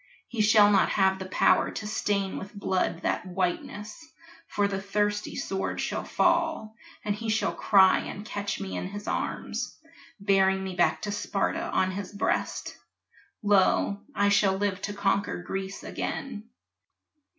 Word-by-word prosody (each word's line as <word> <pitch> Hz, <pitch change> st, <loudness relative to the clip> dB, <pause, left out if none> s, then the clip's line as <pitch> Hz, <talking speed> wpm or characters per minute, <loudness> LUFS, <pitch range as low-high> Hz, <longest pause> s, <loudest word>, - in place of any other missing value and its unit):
He 235 Hz, -3 st, -2 dB
shall 210 Hz, -1 st, +6 dB
not 195 Hz, -2 st, +4 dB
have 190 Hz, -1 st, +2 dB
the 190 Hz, -, -5 dB
power 185 Hz, -, +3 dB
to 210 Hz, -, -6 dB
stain 205 Hz, -2 st, -1 dB
with 200 Hz, +2 st, -10 dB
blood 190 Hz, -2 st, -1 dB
That -, -, 0 dB
whiteness 200 Hz, -, -3 dB, 0.4 s
for 205 Hz, -1 st, +1 dB
the 195 Hz, -1 st, -3 dB
thirsty 205 Hz, +1 st, -1 dB
sword 195 Hz, 0 st, -3 dB
shall -, -, -2 dB
fall 325 Hz, -10 st, +1 dB, 0.3 s
And 205 Hz, -, +1 dB
he 220 Hz, +2 st, -5 dB
shall 220 Hz, +1 st, +1 dB
cry 190 Hz, -2 st, +5 dB
and 205 Hz, -, -7 dB
catch 205 Hz, -1 st, -3 dB
me 195 Hz, -1 st, -5 dB
in -, -, -3 dB
his 205 Hz, +2 st, -8 dB
arms, -, -, -3 dB, 0.4 s
Bearing 190 Hz, -1 st, +3 dB
me 190 Hz, -1 st, -4 dB
back 175 Hz, -, +2 dB
to 205 Hz, -, -2 dB
Sparta 205 Hz, -1 st, -1 dB
on 185 Hz, 0 st, +1 dB
his 190 Hz, 0 st, -5 dB
breast. 200 Hz, -, -2 dB, 0.6 s
Lo, 200 Hz, 0 st, +3 dB, 0.2 s
I 205 Hz, 0 st, +3 dB
shall 200 Hz, -1 st, +4 dB
live 195 Hz, -1 st, -1 dB
to 205 Hz, -, -3 dB
conquer 200 Hz, 0 st, 0 dB
Greece 195 Hz, +1 st, -5 dB
again! 225 Hz, -6 st, -5 dB
200 Hz, 150 wpm, -27 LUFS, 190-210 Hz, 0.6 s, shall